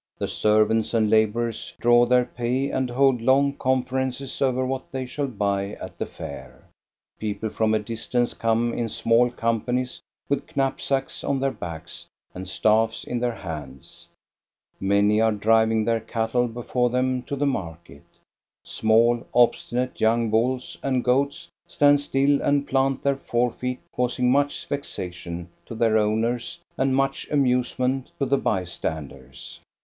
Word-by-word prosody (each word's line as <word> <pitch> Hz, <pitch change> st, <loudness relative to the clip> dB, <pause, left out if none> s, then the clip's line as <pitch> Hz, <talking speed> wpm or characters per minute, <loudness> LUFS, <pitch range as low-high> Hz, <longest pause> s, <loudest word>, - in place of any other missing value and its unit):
The -, -, -2 dB
servants 110 Hz, +2 st, +2 dB
and 110 Hz, -2 st, +2 dB
laborers 110 Hz, +1 st, +1 dB
draw 120 Hz, 0 st, +5 dB
their 125 Hz, 0 st, +4 dB
pay 125 Hz, +4 st, -2 dB
and 130 Hz, -1 st, -1 dB
hold 130 Hz, -1 st, +3 dB
long 140 Hz, +3 st, +3 dB
conferences 130 Hz, 0 st, -2 dB
over 130 Hz, -1 st, +1 dB
what 130 Hz, 0 st, -4 dB
they 130 Hz, -1 st, -3 dB
shall 140 Hz, +3 st, -3 dB
buy 100 Hz, -3 st, -1 dB
at -, -, -9 dB
the -, -, -2 dB
Fair. -, -, -10 dB, 0.5 s
People 105 Hz, 0 st, -3 dB
from 110 Hz, -1 st, +1 dB
a -, -, +4 dB
distance 115 Hz, +3 st, -2 dB
come 115 Hz, +1 st, 0 dB
in 115 Hz, -1 st, -2 dB
small 115 Hz, +3 st, +3 dB
companies 120 Hz, +2 st, -2 dB, 0.3 s
with 140 Hz, +2 st, -3 dB
knapsacks 135 Hz, 0 st, -1 dB
on 135 Hz, -, 0 dB
their 135 Hz, 0 st, 0 dB
backs 85 Hz, -7 st, -8 dB, 0.3 s
and 90 Hz, 0 st, -7 dB
staffs 110 Hz, +3 st, +2 dB
in 120 Hz, -, -3 dB
their 120 Hz, -1 st, -1 dB
hands. 75 Hz, -9 st, -9 dB, 0.7 s
Many 100 Hz, +2 st, +3 dB
are 110 Hz, 0 st, +4 dB
driving 110 Hz, +1 st, +2 dB
their 115 Hz, -1 st, +1 dB
cattle 115 Hz, +2 st, -1 dB
before 120 Hz, +1 st, -1 dB
them 125 Hz, +1 st, 0 dB
to 140 Hz, -, -5 dB
the 140 Hz, +1 st, 0 dB
market. 85 Hz, -, -4 dB, 0.6 s
Small, 115 Hz, +2 st, +2 dB
obstinate 125 Hz, +1 st, +1 dB
young 115 Hz, 0 st, +2 dB
bulls 125 Hz, +3 st, 0 dB
and 130 Hz, -2 st, 0 dB
goats 140 Hz, +3 st, 0 dB, 0.2 s
stand 145 Hz, 0 st, +4 dB
still 140 Hz, 0 st, +2 dB
and 145 Hz, 0 st, +1 dB
plant 135 Hz, 0 st, +1 dB
their 140 Hz, -1 st, +1 dB
forefeet, 125 Hz, 0 st, -1 dB, 0.2 s
causing 125 Hz, 0 st, +1 dB
much 145 Hz, +1 st, +1 dB
vexation 85 Hz, -10 st, -5 dB, 0.2 s
to 115 Hz, -, -7 dB
their 110 Hz, -1 st, +2 dB
owners 115 Hz, +9 st, -1 dB, 0.2 s
and 130 Hz, 0 st, +1 dB
much 135 Hz, 0 st, 0 dB
amusement 130 Hz, -1 st, +1 dB
to 140 Hz, -, 0 dB
the 135 Hz, +1 st, +2 dB
by 95 Hz, -3 st, 0 dB
standers. 70 Hz, -6 st, -7 dB
120 Hz, 145 wpm, -24 LUFS, 110-130 Hz, 0.7 s, draw